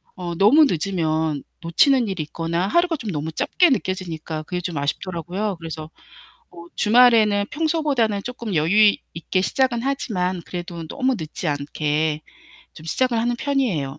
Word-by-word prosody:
어 175 -2 -5
너무 260 - +6
늦으면 160 - -1 0.2
놓치는 235 - +3
일이 185 -5 -3
있거나 170 +4 -2
하루가 345 - +2
좀 225 -9 -5
너무 155 0 -3
짧게 350 - +2
느껴지니까 170 - -3
그게 180 +3 -4
좀 170 -4 -4
아쉽더라고요. 180 +7 -3
그래서 160 -1 -7 0.6
어 170 - -12
주말에는 215 -3 +5
평소보다는 295 -10 0
쪼끔 235 -4 -5
여유 200 +7 +5 0.2
있게 170 +3 -1
시작은 255 +1 +1
하지만 190 -9 -1
그래도 175 -2 -6
너무 265 -1 0
늦지 160 +1 -4
않게 150 +1 -1 0.5
좀 155 - -12
시작을 250 +7 +1
하는 240 +1 0
편이에요. 220 - -1
185 Hz, 345 characters per minute, -22 LUFS, 160-240 Hz, 0.6 s, 너무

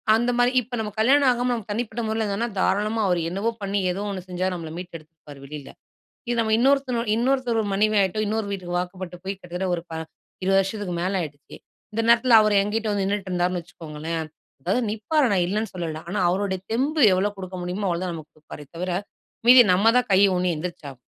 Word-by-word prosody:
அந்த 240 +2 +1
மாரி, 245 0 +4
இப்ப 245 +1 -15
நம்ம 215 -1 -3
கல்யாணம் 270 +4 +5
ஆகாம 245 0 0
நம்ம 230 -4 -4
தனிப்பட்ட 230 +1 -3
முறையில 220 0 -1
இருந்தா 230 +4 -1
தாராளமா 210 +4 +1
அவர் 180 -2 +1
என்னவோ 195 +6 -1
பண்ணி 200 0 -1
ஏதோ 190 +3 -4
ஒண்ணு 195 -2 -4
செஞ்சு 185 +1 -2
நம்மள 165 -3 -6
மீட்டு 180 0 -8
எடுத்துருப்பாரு 155 -2 -15
வெளில. 145 -1 -9 0.6
இது 240 - 0
நம்ம 220 -1 0
இன்னொருத்தன் 270 -1 +2 0.2
இன்னொருத்தர் 245 -1 +1
மனைவி 215 +2 +2
ஆகிட்டோ 195 +2 0
இன்னொரு 220 0 -1
வீட்டுக்கு 180 -3 -4
வாக்கப்பட்டு 180 0 -5
போய் 195 +1 -3
கிட்டத்தட்ட 180 0 -5
ஒரு 170 - -4
ப - - -8 0.5
20 195 +1 +3
வருஷத்துக்கு 195 -1 -3
மேல 190 +2 0
ஆகிடுச்சு. 145 -2 -10 0.4
இந்த 225 +2 -1
நேரத்துல 235 0 +6
அவரு 215 -1 +2
என்கிட்ட 215 +2 -2
வந்து 200 -1 0
நின்னுட்டு 200 0 -2
இருந்தாருன்னு 180 0 0
வச்சுக்கோங்களேன். 160 -1 -6 0.4
அதாவது 190 - 0
நிப்பாரு 240 +8 +1
நான் 185 -3 +2
இல்லன்னு 215 +4 -2
சொல்லல, 165 -3 -4
ஆனா 200 +4 -2
அவருடைய 190 +1 0
தெம்பு 285 +6 +1
எவ்ளோ 195 +3 +1
குடுக்க 185 -1 -7
முடியுமோ 180 +3 -3
அவ்ளோ 170 -1 -1
தான் 180 - -3
நமக்கு 155 -2 -10
கொடுப்பாரே 150 -1 -11
தவர, 180 +2 -3 0.6
மீதி 250 +1 +10
நம்ம 205 +5 +4
தான் 250 - -1
கை 190 - +5 0.2
ஊணி 180 0 +1
எந்திரிச்சாகணும். 155 -5 -7
195 Hz, 195 wpm, -24 LUFS, 180-225 Hz, 0.6 s, மீதி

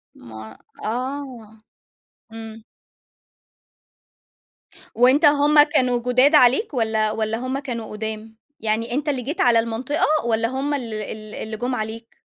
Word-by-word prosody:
ما 110 -1 -11 0.3
آه 245 -2 -5 0.7
إمم. 225 0 -9 2.3
وأنت 255 +6 +4
هُم 295 +1 +5
كانوا 255 -5 +1
جداد 255 +5 +3
عليك 275 - +4
والّا 220 -3 0
والّا 220 0 -2
هُم 255 +2 -3
كانوا 240 -5 -6
قدام؟ 220 +1 -6 0.2
يعني 225 +2 -2
أنت 295 +2 -1
اللي 265 -3 -1
جيت 290 +7 -3
على 235 -2 +4
المنطقة 235 +6 -1 0.2
والّا 230 -1 +1
هُم 270 +4 -2
ال 240 -6 -4
ال 215 0 -7
اللي 220 0 -6
جُم 250 +2 -2
عليك؟ 225 0 -7
235 Hz, 125 wpm, -22 LUFS, 220-265 Hz, 2.3 s, هُم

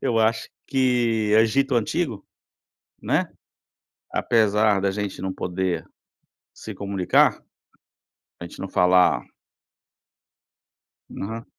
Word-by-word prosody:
Eu 115 -2 0
acho 110 0 +1 0.2
que 120 -5 +1
Egito 130 +4 +2
antigo. 120 - -1 0.8
Né? - - +1 0.9
Apesar 105 -3 +2
da 100 - +1
gente 100 -2 -5
não 95 0 -3
poder 90 0 -3 0.7
se 110 - -9
comunicar. 100 -1 +1 1.0
A - - -6
gente 85 - -11
não 95 - -5
falar 90 0 +3 2.0
Aham. 110 +3 -5
105 Hz, 95 wpm, -23 LUFS, 95-115 Hz, 2.0 s, falar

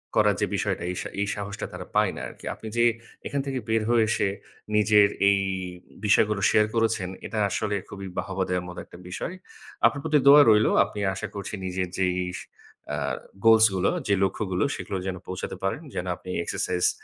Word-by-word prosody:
করার - - +4
যে - - +4
বিষয়টা - - -1
এই - - -5
সা - - -5
এই 100 - 0
সাহসটা 100 0 -5
তারা - - -7
পায় - - +3
না - - -6
আরকি। - - -12
আপনি 110 - -10
যে 120 - +5 0.4
এখান 140 - -1
থেকে 135 -1 -2
বের 110 0 +2
হয়ে 120 -1 +4
এসে, 105 - +1 0.5
নিজের 105 -1 +6 0.2
এই 100 0 +4 0.7
বিষয়গুলো 105 0 +3
share 105 0 +3
করেছেন 110 -5 +1 0.2
এটা 110 - -5
আসলে 105 +2 -1
খুবই 100 -1 -7
বাহবা 95 0 -1
দেওয়ার 90 -1 -1
মতো 90 0 -8
একটা - - -14
বিষয়। 95 - -4 0.5
আপনার 140 - +3
প্রতি 155 -2 +3
দোয়া 145 +1 +10
রইল। 110 0 +5 0.2
আপনি 105 - -7 0.2
আশা 105 +3 -4
করছি 100 0 -5
নিজের 95 0 -2
যেই 90 -1 +1 0.8
আ - - -3 0.5
goals 110 0 +8
গুলো 95 0 +2 0.2
যে 100 - +3
লক্ষ্যগুলো 95 -1 0
সেগুলোতে 95 -2 -4
যেন 95 -1 -3
পৌঁছাতে 95 +1 -5
পারেন। 95 +10 -1
যেন 90 - -2
আপনি 90 - -12
exercise 90 +1 0
100 Hz, 185 wpm, -26 LUFS, 95-110 Hz, 0.8 s, দোয়া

